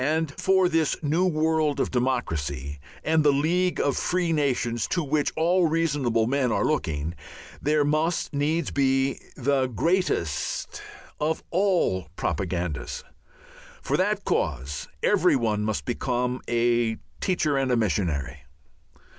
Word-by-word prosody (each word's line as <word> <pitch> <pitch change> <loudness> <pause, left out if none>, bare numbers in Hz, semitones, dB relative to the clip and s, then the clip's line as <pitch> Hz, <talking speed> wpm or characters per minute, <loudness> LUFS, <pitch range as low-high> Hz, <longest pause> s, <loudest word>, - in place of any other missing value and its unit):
And 155 +1 0
for 190 -1 +3
this 165 -3 +1
new 165 +5 +2
world 155 -3 +1
of - - 0
democracy 75 - -2 0.2
and 160 0 +2
the 145 - +5
League 175 +6 +1
of 140 - +1
Free 180 -2 0
Nations 125 -6 0
to 175 - 0
which 145 0 0
all 175 +2 +3
reasonable 145 -8 +1
men 130 0 +1
are - - +1
looking, 80 - -1 0.5
there 150 0 +2
must 155 +3 0
needs 150 +3 0
be 135 -1 +1 0.2
the 135 0 +1
greatest 125 - -1 0.4
of 155 +2 -1
all 175 - +1
propagandas. 85 -7 -3 0.8
For - - 0
that - - 0
cause 70 +4 -2 0.2
every 180 -6 +4
one 110 -4 0
must 110 -1 -2
become 125 0 -1
a 120 -1 +2 0.2
teacher 165 -6 +1
and 135 -1 +1
a 125 - +3
missionary. 75 - -1
140 Hz, 130 wpm, -25 LUFS, 110-160 Hz, 0.8 s, the